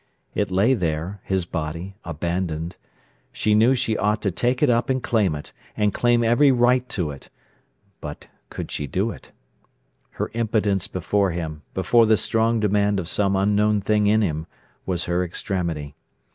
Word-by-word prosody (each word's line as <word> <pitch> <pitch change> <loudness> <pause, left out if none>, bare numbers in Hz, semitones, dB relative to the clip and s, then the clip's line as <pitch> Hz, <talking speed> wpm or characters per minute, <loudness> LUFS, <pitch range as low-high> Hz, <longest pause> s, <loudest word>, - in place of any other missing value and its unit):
It 100 -2 0
lay 100 +7 +3
there, 90 -1 -2
his 95 -2 0
body, 85 +3 -5
abandoned. 85 0 -3 0.6
She 105 - +1
knew 115 +5 +5
she 120 -3 0
ought 105 +1 +1
to 100 - +1
take 125 - 0
it 145 - +4
up 120 +2 +1
and 130 -1 0
claim 105 -9 +1
it, 75 - -9 0.2
and 105 -1 +2
claim 120 -1 +2
every 120 +5 +5
right 125 0 +3
to 85 -7 -2
it. 70 - -12 0.7
But—could 75 -1 -9
she 75 - -3
do 95 - -1
it? - - -13 0.8
Her - - -3
impotence 105 -4 0
before 100 +2 0
him, 80 -3 -4
before 110 +5 +4
the 110 0 +5
strong 115 +2 +1
demand 105 -1 +2
of 85 - -4
some 100 +1 +1
unknown 105 +2 +2
thing 105 +1 +2
in 110 +1 +4
him, 80 -3 -2 0.4
was 90 -2 -1
her 90 +1 0
extremity. 85 -5 -3
100 Hz, 160 wpm, -23 LUFS, 85-110 Hz, 0.8 s, knew